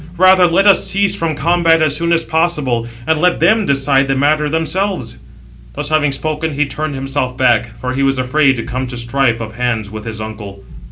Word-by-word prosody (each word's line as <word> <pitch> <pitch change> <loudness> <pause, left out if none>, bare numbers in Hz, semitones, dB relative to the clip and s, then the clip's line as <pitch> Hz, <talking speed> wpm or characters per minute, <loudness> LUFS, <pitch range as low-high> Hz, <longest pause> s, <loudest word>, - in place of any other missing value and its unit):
Rather 185 0 +5
let 175 +4 +2
us 200 -2 +4
cease 200 0 +1
from 165 -5 -2
combat 165 +2 +2
as 155 -2 +1
soon 170 +2 -1
as 165 -1 +2
possible; 150 -9 -1 0.2
and 160 +1 0
let 180 0 +2
them 220 -2 +2
decide 135 0 +2
the 135 - 0
matter 150 +2 +1
themselves." 160 - -2 0.5
Thus 140 - -5
having 155 -2 +1
spoken, 155 +2 -3
he 150 +1 0
turned 145 +2 -4
himself 135 -1 -3
back; 120 -3 +2
for 125 0 -4
he 135 - -2
was 135 -1 +1
afraid 135 +2 +2
to 115 - -4
come 130 +1 -4
to 125 0 -7
strife 120 0 0
of 110 -1 -8
hands 115 -4 -2
with 110 0 -8
his 110 -1 -6
uncle. 105 -2 -8
140 Hz, 205 wpm, -15 LUFS, 125-165 Hz, 0.5 s, Rather